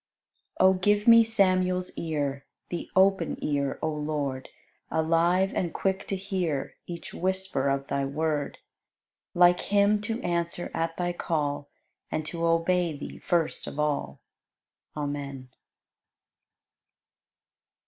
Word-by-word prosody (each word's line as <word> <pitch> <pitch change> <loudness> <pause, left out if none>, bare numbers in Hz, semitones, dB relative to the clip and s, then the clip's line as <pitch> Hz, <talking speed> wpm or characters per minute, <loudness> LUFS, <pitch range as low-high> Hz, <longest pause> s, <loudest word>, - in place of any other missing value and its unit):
91. 190 0 +6
O - - -5
give 205 +3 +2
me 230 0 +9
Samuel's 185 -4 +2
ear, 145 -4 -3 0.2
The 175 - -4
open 190 -2 +3
ear, 140 -2 0
O 160 - +1
Lord, 150 -3 -3 0.4
Alive 170 +4 +2
and 175 -3 -1
quick 190 0 -1
to 195 - -1
hear 185 -7 -2
Each 170 -1 -7
whisper 190 -6 0
of 135 0 -1
Thy 140 0 -1
Word, 150 +1 -2 0.8
Like 175 0 +6
him 205 +1 +2
to 225 +2 -2
answer 170 0 -2
at 165 0 -2
Thy 175 0 -1
call, 145 -4 -2 0.4
And 155 - -2
to 165 +2 -3
obey 165 -1 +1
Thee 145 - -8
first 170 -2 0
of 145 - -6
all. 145 - -1 0.8
Amen. 140 -3 -4
170 Hz, 120 wpm, -27 LUFS, 145-185 Hz, 0.8 s, me